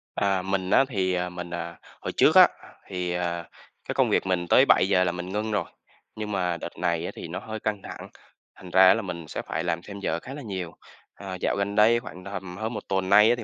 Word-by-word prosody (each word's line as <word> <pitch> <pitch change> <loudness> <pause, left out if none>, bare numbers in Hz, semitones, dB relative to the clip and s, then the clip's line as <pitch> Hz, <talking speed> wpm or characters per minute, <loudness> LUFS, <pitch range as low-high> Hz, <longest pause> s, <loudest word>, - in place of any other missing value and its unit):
À, 95 -2 +1
mình 95 0 -2
á 135 - +5
thì, 95 -6 0
à, 90 0 -1
mình 90 -1 -7
à, 85 0 -5 0.3
hồi - - -3
trước - - +5
á, - - +10 0.4
thì, 90 -2 -3
ờ, 85 -1 -2 0.4
cái - - -2
công - - +3
việc - - +2
mình 90 -2 0
tới 130 - +6
7:00 95 -4 +4
là 90 - +1
mình 90 +1 -6
ngưng 110 +2 -2
rồi, 105 - 0 0.5
nhưng 105 -1 -5
mà 90 -3 0
đợt 85 - -8
này 85 -1 0
á - - -4
thì - - -7
nó - - -5
hơi 110 0 -6
căng 105 -2 -2
thẳng, - - -8 0.5
thành 90 - -12
ra 95 0 +7
á - - +8
là 115 - -1
mình 85 -5 -6
sẽ - - -4
phải 80 - -3
làm 85 -1 -1
thêm 100 -1 -8
giờ 85 - -1
khá 130 +7 -9
là 145 - -7
nhiều. 95 -8 -5 0.4
Ờ, 95 -2 -7
dạo - - +1
gần 100 +1 -2
đây 115 +3 +5
khoảng 90 -6 -10
tầm 95 -2 -7
hơn 110 +3 -3
1 - - -6
tuần 95 -1 0
nay 105 +2 +7
á 120 - +4
thì 120 - -7
95 Hz, 255 wpm, -26 LUFS, 90-105 Hz, 0.5 s, á